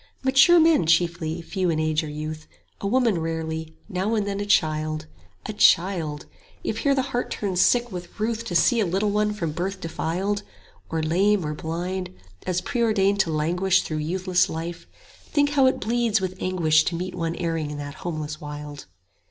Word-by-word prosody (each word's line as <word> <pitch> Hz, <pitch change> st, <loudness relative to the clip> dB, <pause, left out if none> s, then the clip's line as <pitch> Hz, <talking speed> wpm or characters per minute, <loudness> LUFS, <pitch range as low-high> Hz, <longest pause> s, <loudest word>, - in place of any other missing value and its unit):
Mature 270 Hz, +6 st, +6 dB
men 320 Hz, -, +4 dB
chiefly, 165 Hz, 0 st, +1 dB
few 185 Hz, +1 st, -1 dB
in 160 Hz, -2 st, 0 dB
age 155 Hz, 0 st, +1 dB
or 155 Hz, -, -5 dB
youth, 155 Hz, +1 st, -6 dB, 0.3 s
A 200 Hz, -, -3 dB
woman 230 Hz, -4 st, +2 dB
rarely, 160 Hz, 0 st, -4 dB
now 195 Hz, +5 st, -1 dB
and 210 Hz, -2 st, 0 dB
then 200 Hz, 0 st, -3 dB
a 205 Hz, -, -3 dB
child: 155 Hz, -5 st, +1 dB, 0.4 s
A -, -, -4 dB
child! 170 Hz, -7 st, +3 dB, 0.4 s
If -, -, -2 dB
here 280 Hz, -2 st, +2 dB
the 265 Hz, -, +1 dB
heart 245 Hz, -, -1 dB
turns 190 Hz, -4 st, -1 dB
sick 240 Hz, +2 st, +3 dB
with 180 Hz, +2 st, -8 dB
ruth 225 Hz, +1 st, -1 dB
To 180 Hz, -, -4 dB
see 200 Hz, +8 st, +4 dB
a 215 Hz, -, +2 dB
little 195 Hz, +4 st, 0 dB
one 210 Hz, +1 st, +1 dB
from 170 Hz, -7 st, -3 dB
birth 185 Hz, +5 st, -3 dB
defiled, 180 Hz, +5 st, -2 dB
60 205 Hz, -, -19 dB, 0.4 s
Or 160 Hz, -1 st, -1 dB
lame 190 Hz, +3 st, +2 dB
or 150 Hz, -, -2 dB
blind, 175 Hz, -, -4 dB, 0.3 s
as 180 Hz, -1 st, 0 dB
preordained 205 Hz, -2 st, +1 dB
to 170 Hz, -5 st, +2 dB
languish 175 Hz, +5 st, +2 dB
Through 155 Hz, -, -4 dB
youthless 180 Hz, +3 st, +1 dB
life, 165 Hz, +1 st, -6 dB, 0.4 s
think 290 Hz, -1 st, +1 dB
how 275 Hz, -3 st, +4 dB
it 260 Hz, -, +1 dB
bleeds 230 Hz, -1 st, +1 dB
with 185 Hz, -1 st, -3 dB
anguish 160 Hz, -4 st, +3 dB
To 170 Hz, -, -1 dB
meet 180 Hz, +2 st, -4 dB
one 165 Hz, -1 st, -2 dB
erring 165 Hz, -3 st, -2 dB
in 150 Hz, -, -6 dB
that 145 Hz, 0 st, -6 dB
homeless 155 Hz, -3 st, -4 dB
wild. 145 Hz, -1 st, -8 dB
180 Hz, 185 wpm, -24 LUFS, 160-205 Hz, 0.4 s, Mature